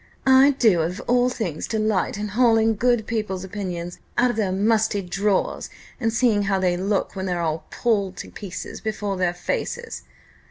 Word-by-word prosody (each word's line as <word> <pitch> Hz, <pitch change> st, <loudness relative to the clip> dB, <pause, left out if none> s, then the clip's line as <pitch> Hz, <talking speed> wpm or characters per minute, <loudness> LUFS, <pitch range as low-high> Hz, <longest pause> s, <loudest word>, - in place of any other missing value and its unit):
"I 265 Hz, +1 st, +6 dB
do 210 Hz, -10 st, +4 dB
of 175 Hz, +4 st, -2 dB
all 245 Hz, +1 st, +2 dB
things 185 Hz, -11 st, -4 dB
delight 215 Hz, -3 st, 0 dB
in 210 Hz, 0 st, -3 dB
hauling 225 Hz, 0 st, +3 dB
good 240 Hz, 0 st, +2 dB
people's 210 Hz, -5 st, -3 dB
opinions 180 Hz, -3 st, -5 dB, 0.2 s
out 245 Hz, 0 st, +4 dB
of -, -, -6 dB
their 210 Hz, -4 st, 0 dB
musty 215 Hz, +1 st, +1 dB
drawers, 195 Hz, +2 st, -1 dB, 0.3 s
and 225 Hz, -3 st, 0 dB
seeing 225 Hz, -3 st, +2 dB
how 195 Hz, -1 st, +1 dB
they 180 Hz, -2 st, +1 dB
look 195 Hz, +3 st, -1 dB
when 190 Hz, 0 st, -3 dB
they're 175 Hz, -1 st, -1 dB
all 160 Hz, -1 st, -2 dB
pulled 200 Hz, -6 st, 0 dB
to -, -, -8 dB
pieces 190 Hz, -3 st, -7 dB
before 210 Hz, -2 st, -2 dB
their 180 Hz, -1 st, 0 dB
faces! 475 Hz, -, -4 dB
205 Hz, 170 wpm, -23 LUFS, 185-225 Hz, 0.3 s, I